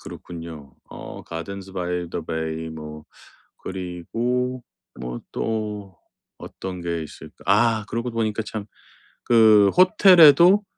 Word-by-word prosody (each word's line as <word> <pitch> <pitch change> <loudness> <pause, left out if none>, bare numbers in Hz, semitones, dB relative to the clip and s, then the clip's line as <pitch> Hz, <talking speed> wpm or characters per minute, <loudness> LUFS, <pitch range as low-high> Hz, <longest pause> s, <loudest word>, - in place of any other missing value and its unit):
그렇군요. 80 -5 -10
어 - - -9
가든스 95 +4 -7
바이 90 -1 -3
더 85 - -5
베이 80 0 -4
뭐 75 -1 -9 0.5
그리고 115 +8 -3 0.4
뭐 60 -1 -6
또 105 -4 -4 0.4
어떤 95 -1 -8
게 85 -1 -3
있을까. 75 - -13
아, 110 +2 +3
그러고 115 +2 -3
보니까 110 -1 -2
참 105 -1 -6 0.6
그 110 -3 +5
호텔에도 185 0 +7
100 Hz, 210 characters per minute, -23 LUFS, 85-115 Hz, 0.6 s, 호텔에도